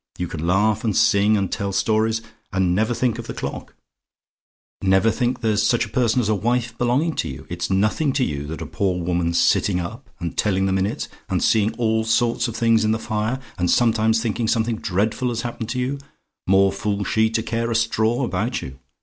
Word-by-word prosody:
You 90 - -2
can 80 0 -5
laugh 105 +4 +2
and 110 -4 0
sing, 105 +2 +4
and 95 -2 -1
tell 100 -2 -2
stories, 110 +3 +1 0.3
and 95 -2 +1
never 110 +5 +1
think 120 0 0
of - - -7
the - - -6
clock; - - -6 1.1
never 95 +3 +3
think 125 +1 -1
there's 110 -2 +1
such 115 +2 +2
a - - -11
person 125 -2 +1
as 115 - 0
a 110 - +2
wife 120 +3 -1
belonging 130 +7 +1
to - - -1
you. 65 - -8
It's - - -3
nothing 105 +10 +1
to 130 - +1
you 70 - -3
that 80 +2 -5
a - - -6
poor 95 -3 -1
woman's 85 -1 0
sitting 90 -3 +2
up, 110 +9 -7
and 85 -2 -4
telling 95 -2 +1
the 95 - 0
minutes, 95 +2 -1 0.2
and - - 0
seeing 110 0 +2
all 110 -2 +1
sorts 115 +2 +1
of 115 - -6
things 115 -2 +3
in 110 0 +2
the - - 0
fire 110 +3 -2 0.2
and 90 0 +1
sometimes 110 -1 +3
thinking 115 0 -1
something 115 0 +1
dreadful 110 +6 -1
has 120 0 -3
happened 120 -2 -5
to 125 +1 -2
you 135 +3 -2 0.5
more 95 +1 +4
fool 100 +1 -2
she 110 +2 +2
to 110 0 -1
care 115 +1 -2
a 115 - -1
straw 115 +2 +1
about 120 +1 -2
you! 65 0 -9
110 Hz, 210 wpm, -22 LUFS, 95-115 Hz, 1.1 s, sing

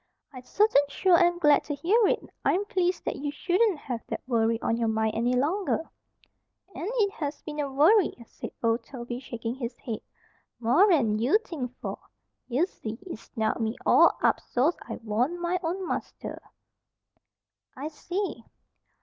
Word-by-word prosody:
"I 255 - -8
certain 410 - +3
sure 365 +5 +3
am 350 0 +3
glad 295 -4 +4
to 295 - -3
hear 400 - +3
it! - - 0 0.2
I'm 395 +3 +2
pleased 365 -2 0
that - - -2
you 290 +1 -3
shouldn't 375 +5 +1
have 250 -5 -5
that - - -4
worry 230 -2 +1
on 230 - 0
your 230 -1 0
mind 220 0 +1
any 240 +3 +1
longer." 325 +5 0 0.8
"And 360 - -4
it 415 -4 +2
has 295 -8 -5
been 300 -1 -6
a 285 -2 -1
worry," 330 +8 +4
said - - -8
Old 230 +1 +2
Toby, 240 -1 -6
shaking 235 -3 -5
his 245 -2 -5
head. 225 -5 -5 0.6
"More'n 245 - +4
you 255 - +4
think 255 - -5
for. - - -4 0.5
Ye 265 +7 +2
see, 225 - -7
it 345 -12 -7
snarled 220 +1 -2
me 220 +1 -1
all - - +6
up - - +4
so's 280 +8 +1
I 230 - -3
warn't 245 +11 0
my 350 +1 0
own 365 +2 -2
master." - - -5 1.4
"I 280 +3 -4
see." 365 +6 -4
285 Hz, 165 wpm, -27 LUFS, 235-350 Hz, 1.4 s, all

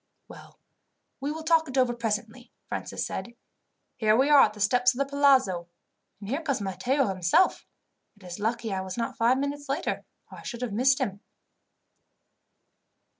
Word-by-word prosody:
"Well, - - -14 0.6
we 280 +2 -3
will 320 +1 -6
talk 320 -2 +3
it 260 - -4
over 255 -2 +3
presently," 235 +1 -4 0.2
Francis - - -4
said. 235 - -6 0.6
"Here 215 -1 +3
we 275 +4 +3
are 285 -2 +8
at - - +4
the 210 - -13
steps 245 +4 +3
of - - -9
the 275 - +1
palazzo, 265 -11 +2 0.5
and 200 - -9
here 275 +9 -2
comes 280 -6 -1
Matteo 205 +8 0
himself. 190 - +2 0.5
It 205 - -20
is 180 +1 -8
lucky 225 0 -2
I 190 - -2
was 190 +2 -6
not 230 - -3
five 235 +3 +3
minutes 285 +1 -4
later, 285 +5 -2 0.3
or - - -10
I - - -13
should 240 0 -6
have 230 -5 -3
missed 260 +5 +3
him." 205 -7 -2
240 Hz, 175 wpm, -27 LUFS, 210-275 Hz, 0.6 s, are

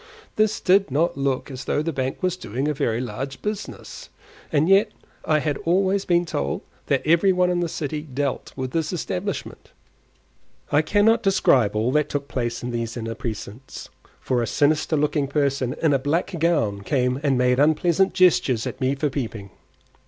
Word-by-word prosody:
This 215 0 +2
did 195 0 +3
not 155 +6 +1
look 135 0 -2
as 130 -1 -7
though 150 - 0
the 165 0 -2
bank 135 +5 -3
was 185 -1 +1
doing 135 - -3
a 150 - +1
very 115 -4 -1
large 135 +2 -5
business; 210 0 -6 0.4
and 155 +1 +2
yet 195 +3 +5 0.4
I 155 - +3
had 150 -2 -1
always 190 +3 +1
been 175 0 +2
told 70 - -2 0.3
that - - +1
every 170 +5 +4
one 180 -1 +2
in 175 - 0
the 175 -1 -1
city 150 -1 -3
dealt 140 -2 -3
with 130 -1 -4
this 160 0 -1
establishment. 185 +2 -4 1.0
I 145 - +4
cannot 205 +7 +3
describe 135 - +3
all 110 +4 +1
that 150 +1 +1
took 140 -1 -3
place 120 -4 -3
in 125 - -3
these 115 0 -3
inner 115 -1 -4
precincts, 115 +1 -7 0.3
for 125 -2 0
a 115 - -1
sinister 155 +2 +1
looking 145 -1 +1
person 140 -3 0
in 155 -3 +4
a 135 - +2
black 150 +8 -1
gown 145 -12 +1
came 125 +3 0
and 140 -4 +1
made 125 0 +2
unpleasant 165 +5 +3
gestures 145 -10 +3
at - - -6
me 130 +2 +1
for 145 +1 -1
peeping. 110 -8 -5
145 Hz, 180 wpm, -23 LUFS, 125-170 Hz, 1.0 s, yet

